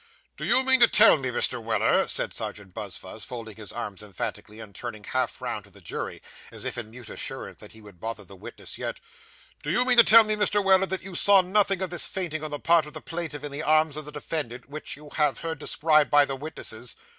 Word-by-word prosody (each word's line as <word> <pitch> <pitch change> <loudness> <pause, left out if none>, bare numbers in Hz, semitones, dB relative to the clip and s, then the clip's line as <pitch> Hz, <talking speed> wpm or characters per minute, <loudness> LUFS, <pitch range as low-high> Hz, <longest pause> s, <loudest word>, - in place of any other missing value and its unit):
'Do - - -6
you 260 - +3
mean 260 0 +4
to 235 - +8
tell 225 0 +7
me, 135 -4 -3
Mr. 125 0 0
Weller,' 110 -2 +2
said - - 0
Serjeant 100 -3 -6
Buzfuz, 100 0 -7
folding 115 -2 -7
his 105 -3 -7
arms 105 -5 -6
emphatically, 105 +1 -6
and 110 -3 -10
turning 105 +3 -7
half 130 +2 -2
round - - -4
to - - -15
the - - -15
jury, - - -6 0.3
as - - -7
if - - -3
in 120 -3 -5
mute 120 0 -10
assurance - - -4
that - - -12
he 110 - -12
would 105 -4 -15
bother 110 +1 -5
the 100 - -13
witness 90 - -8
yet - - -4 0.6
'do 150 - -5
you 245 +10 +2
mean 250 -1 +2
to 235 - +10
tell 225 +1 +8
me, 215 0 -1
Mr. 205 -1 +2
Weller, 190 0 +4
that 190 0 -4
you 190 0 -8
saw 195 +2 +6
nothing 195 0 +1
of 185 - -4
this 175 - +2
fainting 165 -5 -3
on 155 - -4
the 145 -1 -5
part 165 -1 +3
of 150 - -11
the - - -6
plaintiff 165 -4 -5
in 145 - -5
the 140 +2 -4
arms 155 -1 +3
of 155 -1 -5
the 150 - -9
defendant, 145 -4 -5
which 150 +2 -3
you 150 0 -13
have 150 -3 +1
heard 160 -3 -4
described 155 -1 +3
by 145 0 +6
the 135 - -3
witnesses? 125 -5 -5
150 Hz, 240 wpm, -26 LUFS, 115-175 Hz, 0.6 s, to